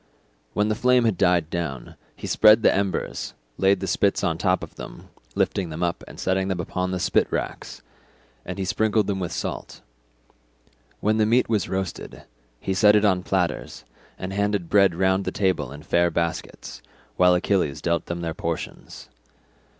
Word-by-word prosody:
When 105 Hz, 0 st, +1 dB
the 110 Hz, -, +1 dB
flame 125 Hz, +2 st, +3 dB
had 110 Hz, -4 st, +2 dB
died 85 Hz, -2 st, +2 dB
down, 75 Hz, -8 st, -4 dB, 0.2 s
he -, -, -9 dB
spread 110 Hz, +1 st, +5 dB
the -, -, +5 dB
embers, 100 Hz, -1 st, -2 dB, 0.2 s
laid 95 Hz, 0 st, +3 dB
the -, -, -2 dB
spits -, -, +1 dB
on -, -, +1 dB
top -, -, +1 dB
of -, -, -9 dB
them, -, -, -10 dB, 0.3 s
lifting 95 Hz, -4 st, 0 dB
them 80 Hz, +2 st, -4 dB
up 85 Hz, -1 st, -2 dB
and -, -, -12 dB
setting 95 Hz, 0 st, 0 dB
them 95 Hz, -2 st, -2 dB
upon 90 Hz, +2 st, -2 dB
the 95 Hz, 0 st, -2 dB
spit 90 Hz, -, +1 dB
racks; -, -, -4 dB, 0.6 s
and 90 Hz, -, -6 dB
he 95 Hz, -, -2 dB
sprinkled 110 Hz, +2 st, +1 dB
them 100 Hz, -1 st, -2 dB
with 90 Hz, -3 st, -3 dB
salt. -, -, -5 dB, 1.2 s
When 110 Hz, +1 st, +2 dB
the 110 Hz, -1 st, +3 dB
meat 120 Hz, +3 st, +3 dB
was 105 Hz, -5 st, 0 dB
roasted, 95 Hz, -2 st, -4 dB, 0.4 s
he 95 Hz, -, -2 dB
set 105 Hz, +2 st, +5 dB
it 105 Hz, 0 st, +4 dB
on 95 Hz, -3 st, +3 dB
platters, 90 Hz, -9 st, -2 dB, 0.3 s
and 95 Hz, +1 st, -5 dB
handed 100 Hz, -3 st, -1 dB
bread 100 Hz, -4 st, +4 dB
round 95 Hz, +2 st, +2 dB
the -, -, -3 dB
table 95 Hz, -9 st, 0 dB
in 75 Hz, +1 st, -10 dB
fair 85 Hz, +3 st, +2 dB
baskets, 85 Hz, -7 st, -4 dB, 0.3 s
while 90 Hz, 0 st, +5 dB
Achilles 90 Hz, -5 st, 0 dB
dealt 85 Hz, 0 st, -1 dB
them 85 Hz, 0 st, -4 dB
their 85 Hz, -1 st, -3 dB
portions. -, -, -6 dB
95 Hz, 175 wpm, -24 LUFS, 85-105 Hz, 1.2 s, spread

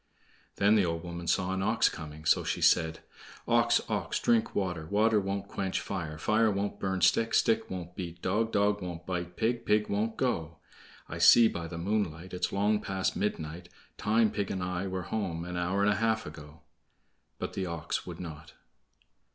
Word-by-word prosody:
Then 100 Hz, +1 st, +4 dB
the 105 Hz, -3 st, +4 dB
old 85 Hz, -1 st, -2 dB
woman 85 Hz, -1 st, -6 dB
saw 90 Hz, +2 st, +1 dB
an 95 Hz, -, -2 dB
ox 110 Hz, +3 st, +3 dB
coming; 80 Hz, -1 st, -7 dB
so -, -, +4 dB
she -, -, -2 dB
said: 80 Hz, 0 st, +3 dB, 0.5 s
"Ox, -, -, +4 dB
ox, -, -, -1 dB
drink 115 Hz, -2 st, +2 dB
water; 90 Hz, -5 st, -2 dB
Water 105 Hz, +3 st, +3 dB
won't 100 Hz, 0 st, -3 dB
quench 95 Hz, -1 st, -2 dB
fire; 80 Hz, -6 st, -5 dB
Fire 110 Hz, +7 st, +2 dB
won't 100 Hz, 0 st, -2 dB
burn 95 Hz, -1 st, -2 dB
stick; 115 Hz, +6 st, +3 dB
Stick 115 Hz, 0 st, +2 dB
won't 90 Hz, -1 st, -6 dB
beat 85 Hz, -2 st, -6 dB
dog; 105 Hz, +6 st, 0 dB
Dog 105 Hz, 0 st, +2 dB
won't 85 Hz, -2 st, -6 dB
bite 90 Hz, -1 st, -4 dB
pig; 115 Hz, +1 st, 0 dB
Pig 105 Hz, -1 st, +2 dB
won't 110 Hz, +2 st, -1 dB
go; 85 Hz, -11 st, -1 dB, 0.5 s
I -, -, -6 dB
see 115 Hz, -1 st, +8 dB
by 85 Hz, -5 st, -4 dB
the 85 Hz, 0 st, -7 dB
moonlight 90 Hz, -2 st, -2 dB
It's 90 Hz, 0 st, -1 dB
long 105 Hz, +2 st, +1 dB
past 95 Hz, 0 st, -1 dB
midnight; 85 Hz, -3 st, -3 dB, 0.3 s
Time 110 Hz, +1 st, +3 dB
pig 100 Hz, -2 st, -2 dB
and 95 Hz, -2 st, -3 dB
I 90 Hz, +1 st, -2 dB
were 95 Hz, -1 st, -3 dB
home 85 Hz, -5 st, -3 dB
an 90 Hz, 0 st, -5 dB
hour 90 Hz, +3 st, 0 dB
and 105 Hz, -, +4 dB
a -, -, -2 dB
half 110 Hz, 0 st, +1 dB
ago." 75 Hz, 0 st, -11 dB, 0.8 s
But -, -, -5 dB
the 95 Hz, -1 st, -2 dB
ox 85 Hz, -3 st, -3 dB
would -, -, -7 dB
not. 80 Hz, -4 st, -8 dB
95 Hz, 185 wpm, -30 LUFS, 85-105 Hz, 0.8 s, see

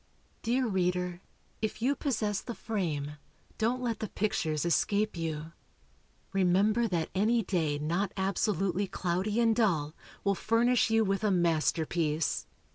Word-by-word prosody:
Dear 250 Hz, +3 st, +1 dB
reader, 180 Hz, -3 st, 0 dB, 0.4 s
if 220 Hz, -1 st, -2 dB
you 265 Hz, +5 st, +2 dB
possess 215 Hz, -9 st, -1 dB
the 235 Hz, -, -6 dB
frame, 150 Hz, -9 st, -3 dB, 0.4 s
don't 240 Hz, +3 st, +1 dB
let 230 Hz, -4 st, -1 dB
the 215 Hz, -, -4 dB
pictures 160 Hz, -7 st, -1 dB
escape 205 Hz, +5 st, +1 dB
you. 160 Hz, -1 st, -4 dB, 0.8 s
Remember 195 Hz, +5 st, +3 dB
that 170 Hz, -5 st, -1 dB
any 220 Hz, +4 st, +2 dB
day 160 Hz, -6 st, 0 dB
not 170 Hz, +7 st, -1 dB
absolutely 195 Hz, 0 st, 0 dB
cloudy 185 Hz, +5 st, -1 dB
and 230 Hz, -1 st, +4 dB
dull, 165 Hz, -10 st, +1 dB, 0.3 s
will 200 Hz, -, +3 dB
furnish 230 Hz, +5 st, +2 dB
you 225 Hz, 0 st, +3 dB
with 195 Hz, +1 st, 0 dB
a 210 Hz, -, +3 dB
masterpiece. 165 Hz, -2 st, +1 dB
195 Hz, 130 wpm, -30 LUFS, 170-220 Hz, 0.8 s, and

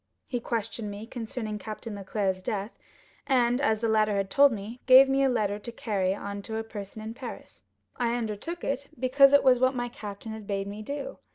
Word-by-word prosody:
He 245 Hz, -, -3 dB
questioned 230 Hz, -2 st, -3 dB
me 205 Hz, +2 st, -7 dB
concerning 225 Hz, -2 st, -5 dB
Captain 215 Hz, +1 st, -7 dB
Leclere's 195 Hz, -1 st, -2 dB
death; 200 Hz, +3 st, -3 dB, 0.6 s
and, 245 Hz, -2 st, +3 dB
as 220 Hz, -6 st, +1 dB
the 230 Hz, -, +1 dB
latter 215 Hz, -1 st, +3 dB
had 195 Hz, -1 st, -1 dB
told 280 Hz, 0 st, +6 dB
me, 220 Hz, +3 st, -6 dB
gave 260 Hz, +1 st, +9 dB
me 270 Hz, 0 st, +2 dB
a 270 Hz, -, +4 dB
letter 210 Hz, -4 st, 0 dB
to 235 Hz, +3 st, -7 dB
carry 195 Hz, -5 st, -1 dB
on 200 Hz, 0 st, -5 dB
to 220 Hz, +3 st, -5 dB
a 225 Hz, -, -2 dB
person 215 Hz, -1 st, -8 dB
in 220 Hz, +1 st, -5 dB
Paris. 245 Hz, -1 st, -9 dB, 0.3 s
I 235 Hz, -1 st, +1 dB
undertook 240 Hz, +9 st, -4 dB
it 275 Hz, 0 st, -2 dB
because 270 Hz, +2 st, +6 dB
it 285 Hz, -, +6 dB
was 255 Hz, -2 st, +5 dB
what 255 Hz, +1 st, +3 dB
my 245 Hz, -1 st, -2 dB
captain 210 Hz, -1 st, -8 dB
had 220 Hz, -2 st, -8 dB
bade 195 Hz, -1 st, -1 dB
me 205 Hz, +2 st, -6 dB
do. 290 Hz, -, -5 dB
225 Hz, 205 wpm, -28 LUFS, 205-255 Hz, 0.6 s, gave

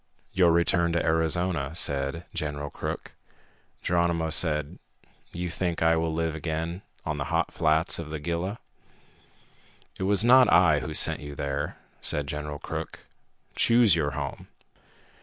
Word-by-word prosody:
"Your 90 Hz, -3 st, +4 dB
return 85 Hz, 0 st, +2 dB
to 85 Hz, -, 0 dB
Arizona," 80 Hz, -2 st, 0 dB
said 70 Hz, +1 st, -1 dB
General 75 Hz, -3 st, -4 dB
Crook. -, -, -5 dB, 0.7 s
Geronimo 85 Hz, -2 st, +1 dB
said, 75 Hz, -2 st, 0 dB, 0.5 s
"You 90 Hz, 0 st, -4 dB
think 85 Hz, -1 st, -1 dB
I 80 Hz, 0 st, +4 dB
will 80 Hz, 0 st, 0 dB
live 80 Hz, 0 st, -1 dB
again 80 Hz, +3 st, -3 dB, 0.2 s
on -, -, -2 dB
the -, -, -2 dB
hot -, -, -1 dB
flats 80 Hz, +2 st, +2 dB
of 80 Hz, -2 st, -6 dB
the 80 Hz, -, -4 dB
Gila?" 85 Hz, +7 st, -3 dB, 1.4 s
"It -, -, -4 dB
was 100 Hz, +2 st, +3 dB
not 125 Hz, +1 st, +7 dB
I 85 Hz, -3 st, +5 dB
who 75 Hz, +3 st, -5 dB
sent -, -, +3 dB
you 75 Hz, 0 st, -8 dB
there," 70 Hz, +1 st, -3 dB, 0.2 s
said 75 Hz, -, -1 dB
General 75 Hz, 0 st, -5 dB
Crook. -, -, -6 dB, 0.5 s
"Choose 115 Hz, -5 st, +5 dB
your 75 Hz, -3 st, 0 dB
home. 70 Hz, -2 st, -5 dB
80 Hz, 140 wpm, -27 LUFS, 75-85 Hz, 1.4 s, not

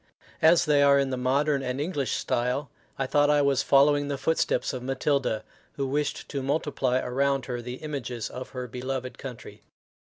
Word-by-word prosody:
As 165 Hz, +2 st, +5 dB
they 150 Hz, -2 st, +4 dB
are 140 Hz, 0 st, +6 dB
in 135 Hz, -1 st, +1 dB
the -, -, 0 dB
modern 135 Hz, +3 st, +1 dB
and 125 Hz, 0 st, -3 dB
English 145 Hz, -3 st, -1 dB
style, 125 Hz, +4 st, -1 dB, 0.3 s
I 135 Hz, -, 0 dB
thought 145 Hz, +2 st, +3 dB
I 145 Hz, -1 st, +4 dB
was 140 Hz, -2 st, +2 dB
following 145 Hz, +1 st, +4 dB
the 140 Hz, -1 st, -2 dB
footsteps 160 Hz, +1 st, 0 dB
of 130 Hz, -, -4 dB
Matilda, 135 Hz, -3 st, 0 dB, 0.3 s
who 140 Hz, -, -2 dB
wished 145 Hz, +1 st, -2 dB
to 140 Hz, -, -3 dB
multiply 135 Hz, -2 st, 0 dB
around 135 Hz, +1 st, 0 dB
her 120 Hz, -2 st, -4 dB
the 125 Hz, +1 st, -6 dB
images 130 Hz, -6 st, -5 dB
of 130 Hz, 0 st, -7 dB
her 125 Hz, -1 st, -6 dB
beloved 130 Hz, +1 st, -5 dB
country. 115 Hz, -5 st, -9 dB
135 Hz, 175 wpm, -27 LUFS, 125-145 Hz, 0.3 s, are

